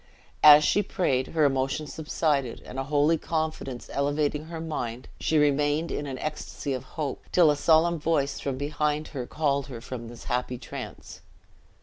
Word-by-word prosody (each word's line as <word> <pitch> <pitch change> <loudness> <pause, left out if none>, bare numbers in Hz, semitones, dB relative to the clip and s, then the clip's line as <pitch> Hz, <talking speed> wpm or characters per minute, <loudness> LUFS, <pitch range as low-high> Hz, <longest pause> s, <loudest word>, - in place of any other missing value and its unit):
As 150 0 +9
she 205 - +3
prayed, 135 -9 0
her 155 -2 +2
emotion 135 +2 0
subsided 150 -4 -1
and 130 - -6
a 135 - -2
holy 150 +3 +2
confidence 155 -6 -3
elevating 145 +1 0
her 165 0 -7
mind, 125 -7 -4
she 160 - +1
remained 150 +2 +2
in 145 - -3
an 135 -2 -5
ecstasy 150 -1 -4
of 130 -1 -4
hope, 145 -4 -3
till 170 -4 +6
a - - +1
solemn 165 +3 +3
voice 145 -3 0
from 135 -2 -3
behind 150 +2 -1
her 130 -4 -5
called 140 -3 0
her 125 -4 -7
from 120 0 -7
this 120 0 -11
happy 125 0 -2
trance. 125 - -9
145 Hz, 165 wpm, -27 LUFS, 135-155 Hz, -, As